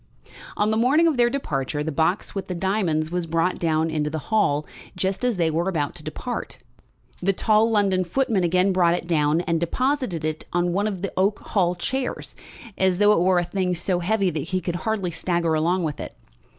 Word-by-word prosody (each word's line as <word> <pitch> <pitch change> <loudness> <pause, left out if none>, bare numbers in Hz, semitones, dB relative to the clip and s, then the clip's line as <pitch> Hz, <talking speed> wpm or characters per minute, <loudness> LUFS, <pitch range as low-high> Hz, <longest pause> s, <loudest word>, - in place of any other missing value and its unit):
On 210 +1 +2
the 220 - +1
morning 275 +8 +4
of 320 - +2
their 240 -1 +3
departure 150 - -2
the 160 - -3
box 165 +6 0
with 195 -2 -4
the 180 - -4
diamonds 170 -4 0
was 175 -1 -2
brought 165 +3 0
down 160 -1 +1
into 150 -1 -1
the 160 - -3 0.2
hall 150 -9 +2 0.3
just 190 +3 -2
as 245 -5 +1
they 165 -2 +1
were 170 +4 0
about 150 -6 -1
to - - -11
depart. - - -5 0.6
The 195 +2 +2
tall 215 +3 +3
London 200 -4 +2
footman 220 +1 0
again 180 +3 +2
brought 175 -2 +3
it 175 - -4
down, 155 -1 +2
and 170 -2 0
deposited 245 - -1
it 155 0 -3
on 175 0 0
one 200 +3 +1
of 195 -3 -4
the 195 - -3
oak 200 +3 +2
hall 180 -3 0
chairs, 260 +9 -3 0.5
as 190 -1 +3
though 205 +1 +5
it 210 - +4
were 180 +1 +3
a 175 - +2
thing 180 0 -1
so 175 +1 0
heavy 195 +1 +1
that 155 - -3
he 185 +6 -2
could 175 0 -3
hardly 200 -3 -2
stagger 170 -1 -1
along 170 +4 +1
with 150 -3 -3
it. - - -7
180 Hz, 210 wpm, -23 LUFS, 165-205 Hz, 0.6 s, though